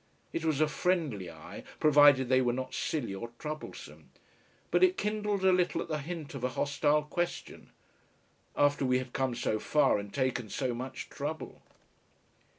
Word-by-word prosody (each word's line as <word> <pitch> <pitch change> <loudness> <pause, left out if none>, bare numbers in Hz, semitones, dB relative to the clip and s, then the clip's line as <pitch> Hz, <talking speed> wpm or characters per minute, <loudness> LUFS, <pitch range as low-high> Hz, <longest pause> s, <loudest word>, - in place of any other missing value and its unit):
It 165 - -2
was 155 -3 +1
a 155 - +4
friendly 150 - -1
eye, - - -10 0.2
provided 145 -3 +6
they 130 +1 +4
were 120 -1 +1
not 130 +1 -4
silly 150 -11 -2
or 115 +5 -6
troublesome. 155 +3 -8 0.6
But - - +4
it 370 0 +4
kindled 210 -2 -1
a 190 - +6
little 180 -1 +2
at - - -4
the 155 -1 -1
hint 155 0 -6
of 135 -3 -7
a 125 - +1
hostile 145 +1 +2
question. 175 +3 -4 0.9
After 145 -1 +3
we 125 -1 +3
had 130 -1 -5
come 130 -2 0
so 110 -2 -1
far 145 -5 +3
and 100 0 -7
taken 130 -3 -1
so 130 +1 -1
much 130 +2 -6
trouble! 150 +3 -5
145 Hz, 165 wpm, -30 LUFS, 130-160 Hz, 0.9 s, provided